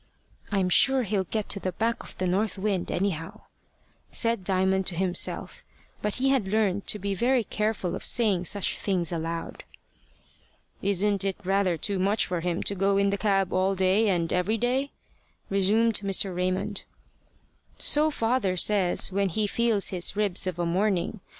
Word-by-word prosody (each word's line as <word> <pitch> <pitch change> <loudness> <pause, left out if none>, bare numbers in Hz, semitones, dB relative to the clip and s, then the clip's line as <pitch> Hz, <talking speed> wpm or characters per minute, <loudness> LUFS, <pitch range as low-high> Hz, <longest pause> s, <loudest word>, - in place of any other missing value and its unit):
"I'm 195 -3 +1
sure 265 +7 +4
he'll 200 -3 -1
get 215 +2 -3
to 200 - -2
the 185 -1 -3
back 230 +5 -1
of - - -12
the 185 - -1
north 200 +4 0
wind, 195 -2 -1
anyhow," 175 -4 -3 0.7
said 230 -4 0
Diamond 190 0 +1
to 180 - +1
himself; 180 0 -3 0.4
but 210 -1 0
he 265 +1 +1
had 260 -8 +1
learned 200 -1 0
to - - +1
be 200 0 -3
very 240 +4 +1
careful 210 -4 -2
of - - -7
saying 205 -7 +2
such 200 +2 -1
things 185 -4 0
aloud. 165 0 -4 1.2
"Isn't 200 +1 +1
it 195 -1 -2
rather 190 -2 +1
too 195 +5 -1
much 200 +4 +2
for 180 -1 -2
him 175 0 -2
to - - +1
go 195 +1 +1
in 200 0 +2
the 200 - -1
cab 195 -3 +1
all 190 +1 +1
day 190 +4 +2
and 170 -3 0
every 180 +5 +1
day?" 255 +5 0 0.6
resumed 210 +3 +3
Mr. 195 -2 0
Raymond. 185 +3 -1 0.9
"So 300 +1 +3
father 225 -8 0
says, 195 -1 +2
when 195 0 0
he 210 +5 0
feels 225 -1 +1
his 180 +1 0
ribs 200 -3 +1
of 180 -2 -3
a 175 - -1
morning. 190 +3 0
195 Hz, 170 wpm, -26 LUFS, 185-215 Hz, 1.2 s, sure